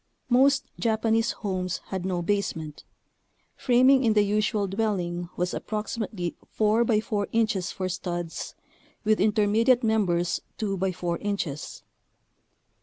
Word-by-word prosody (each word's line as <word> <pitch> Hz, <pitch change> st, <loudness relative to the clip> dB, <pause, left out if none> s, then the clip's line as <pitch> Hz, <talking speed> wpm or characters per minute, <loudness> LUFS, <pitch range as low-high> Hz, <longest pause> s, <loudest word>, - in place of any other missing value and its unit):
Most 275 Hz, +3 st, +4 dB
Japanese 225 Hz, 0 st, +1 dB
homes 185 Hz, -3 st, -2 dB
had 190 Hz, -2 st, -3 dB
no 180 Hz, -2 st, -1 dB
basement. 165 Hz, -6 st, -2 dB, 0.7 s
Framing 255 Hz, +1 st, +4 dB
in 225 Hz, -2 st, +3 dB
the 210 Hz, -1 st, +4 dB
usual 210 Hz, 0 st, +1 dB
dwelling 185 Hz, -4 st, -2 dB
was 180 Hz, 0 st, -1 dB
approximately 210 Hz, -4 st, -3 dB
four 215 Hz, +2 st, +2 dB
by 220 Hz, -2 st, +2 dB
four 210 Hz, -2 st, -2 dB
inches 215 Hz, -5 st, +1 dB
for 185 Hz, -, -3 dB
studs, 175 Hz, -2 st, -4 dB, 0.5 s
with 215 Hz, 0 st, +2 dB
intermediate 220 Hz, +4 st, +3 dB
members 180 Hz, -6 st, +1 dB, 0.2 s
two 205 Hz, -3 st, -1 dB
by 190 Hz, 0 st, 0 dB
four 175 Hz, -1 st, -3 dB
inches. 185 Hz, -8 st, -4 dB
205 Hz, 120 wpm, -26 LUFS, 180-220 Hz, 0.7 s, Most